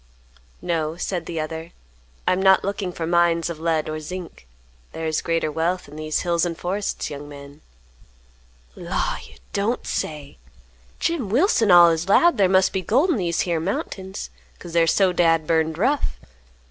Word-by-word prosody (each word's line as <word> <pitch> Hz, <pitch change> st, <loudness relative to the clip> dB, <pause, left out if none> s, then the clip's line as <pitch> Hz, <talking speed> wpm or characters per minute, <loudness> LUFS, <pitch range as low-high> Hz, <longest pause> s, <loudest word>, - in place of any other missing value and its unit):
"No," 160 Hz, -2 st, -1 dB
said 175 Hz, -1 st, -3 dB
the 165 Hz, -2 st, -4 dB
other, 160 Hz, +2 st, -5 dB, 0.5 s
"I -, -, +4 dB
am 185 Hz, -, -1 dB
not 190 Hz, 0 st, +5 dB
looking 200 Hz, -2 st, -2 dB
for 170 Hz, -2 st, -4 dB
mines 170 Hz, 0 st, +2 dB
of 160 Hz, -, -8 dB
lead 160 Hz, -1 st, 0 dB
or 155 Hz, 0 st, -4 dB
zinc; 170 Hz, -, -8 dB, 0.5 s
there 160 Hz, -, -5 dB
is 155 Hz, -1 st, 0 dB
greater 165 Hz, -2 st, -1 dB
wealth 170 Hz, +4 st, -1 dB
in 145 Hz, -, -12 dB
these 155 Hz, 0 st, -2 dB
hills 170 Hz, -2 st, +1 dB
and 170 Hz, -2 st, -2 dB
forests, 195 Hz, 0 st, -3 dB
young 145 Hz, 0 st, -8 dB
man." 140 Hz, +1 st, -12 dB, 1.1 s
"Law, -, -, -2 dB
you -, -, -17 dB, 0.2 s
don't 205 Hz, +5 st, -1 dB
say! 150 Hz, -, -4 dB, 0.6 s
Jim 310 Hz, -, -1 dB
Wilson 235 Hz, -, +3 dB
allus 170 Hz, 0 st, +6 dB
'lowed 340 Hz, +7 st, +5 dB
thar 190 Hz, -2 st, +4 dB
must 190 Hz, 0 st, +3 dB
be 190 Hz, -, -1 dB
gold 265 Hz, -, +2 dB
in 300 Hz, -, +1 dB
these 170 Hz, -4 st, 0 dB
here 170 Hz, -2 st, 0 dB
mountains, 190 Hz, +2 st, -4 dB, 0.3 s
'cause 170 Hz, -2 st, -10 dB
they're 165 Hz, -1 st, +3 dB
so 185 Hz, +3 st, +3 dB
dad 165 Hz, -2 st, +3 dB
burned 160 Hz, 0 st, +1 dB
rough. 270 Hz, -, 0 dB
170 Hz, 170 wpm, -23 LUFS, 160-190 Hz, 1.1 s, allus